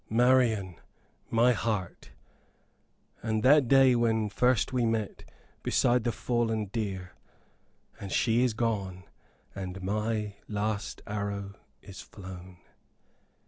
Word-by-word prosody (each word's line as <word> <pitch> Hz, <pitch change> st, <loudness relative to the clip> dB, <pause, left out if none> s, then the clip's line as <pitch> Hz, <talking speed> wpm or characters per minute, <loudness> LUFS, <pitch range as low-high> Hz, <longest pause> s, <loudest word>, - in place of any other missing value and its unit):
Marian, 115 Hz, -6 st, +3 dB, 0.5 s
my 120 Hz, +2 st, +4 dB
heart... 105 Hz, -6 st, -3 dB, 1.1 s
and 110 Hz, -1 st, -1 dB
that 145 Hz, 0 st, +6 dB
day 135 Hz, 0 st, +6 dB
when 115 Hz, -2 st, +1 dB
first 125 Hz, +3 st, +1 dB
we 125 Hz, -2 st, +1 dB
met, 115 Hz, -3 st, -1 dB, 0.4 s
beside 120 Hz, -1 st, +2 dB
the 120 Hz, -, +2 dB
fallen 115 Hz, -2 st, -1 dB
deer! 95 Hz, -3 st, -4 dB, 0.9 s
And 100 Hz, -1 st, -7 dB
she 115 Hz, 0 st, +2 dB
is 120 Hz, -4 st, +1 dB
gone, 100 Hz, -6 st, -2 dB, 0.5 s
and 95 Hz, -1 st, -6 dB
my 105 Hz, +1 st, -2 dB
last 105 Hz, 0 st, -3 dB
arrow 100 Hz, -1 st, -4 dB, 0.3 s
is 95 Hz, -1 st, -10 dB
flown.... 95 Hz, -2 st, -11 dB
110 Hz, 105 wpm, -29 LUFS, 100-120 Hz, 1.1 s, that